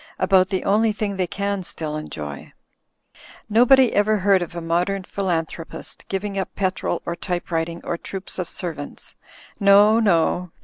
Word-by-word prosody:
About 185 -1 +4
the 190 -2 -1
only 215 +2 +3
thing 210 -1 -3
they 185 -2 -1
can 200 +1 -2
still 155 -3 -5
enjoy. 75 - -7 0.9
Nobody 245 +3 +5
ever 210 +1 +3
heard 195 -1 +3
of 175 0 -5
a - - -3
modem 175 +4 0
philanthropist 165 -4 -4
giving 195 0 -3
up 190 - -4
petrol 190 -1 -1
or 170 - -2
typewrit 170 -2 -2
ing 170 - -8
or 170 - -3
troops 195 0 -7
of 180 - -3
servants. 155 -5 -6 0.5
No, 205 +2 +6
no! 180 -3 +1
185 Hz, 150 wpm, -22 LUFS, 170-200 Hz, 0.9 s, No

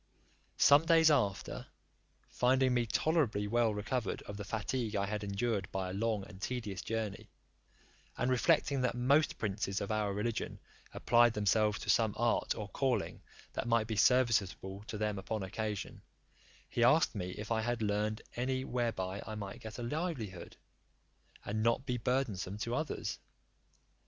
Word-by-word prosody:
Some 145 +3 +6
days 165 -2 +6
after, 105 -10 0 0.6
finding 130 +1 +2
me 120 -1 +1
tolerably 130 -7 +1
well 115 +1 +2
recovered 105 +2 -2
of 100 - -7
the 105 - -5
fatigue 110 +2 -2
I 100 -1 +1
had 105 +1 -3
endured 100 -1 -1
by 95 -1 -2
a - - -6
long 105 0 -1
and 95 -1 -13
tedious 105 -5 -3
journey, 110 -3 -4 0.9
and 125 +1 +1
reflecting 130 +2 +3
that 125 -1 0
most 140 +5 +3
princes 100 -2 -2
of 100 - -3
our 105 -2 0
religion 105 +3 -2 0.3
applied 120 -1 +4
themselves 105 0 +2
to - - +2
some 110 -3 +2
art 120 0 +1
or 105 -2 -5
calling 125 -5 -1 0.3
that - - -3
might 115 -2 +3
be 110 0 -3
serviceable 100 -4 +2
to 105 - -5
them 105 -1 -1
upon 110 +1 -3
occasion, 105 +1 -4 0.7
he 120 - 0
asked 155 +7 +5
me, 90 -3 -4
if 105 +2 -6
I 110 -1 +2
had 120 0 -1
learned 105 +1 -1
any 130 +2 -1
whereby 115 -7 -2
I 110 - -5
might 100 -2 -6
get 110 0 -8
a 120 - -5
livelihood, 120 - -4 0.9
and 110 +2 -2
not 115 +4 +2
be 125 -2 -1
burdensome 115 -6 -1
to 115 - -2
others? 155 +3 -2
110 Hz, 155 wpm, -33 LUFS, 100-125 Hz, 0.9 s, Some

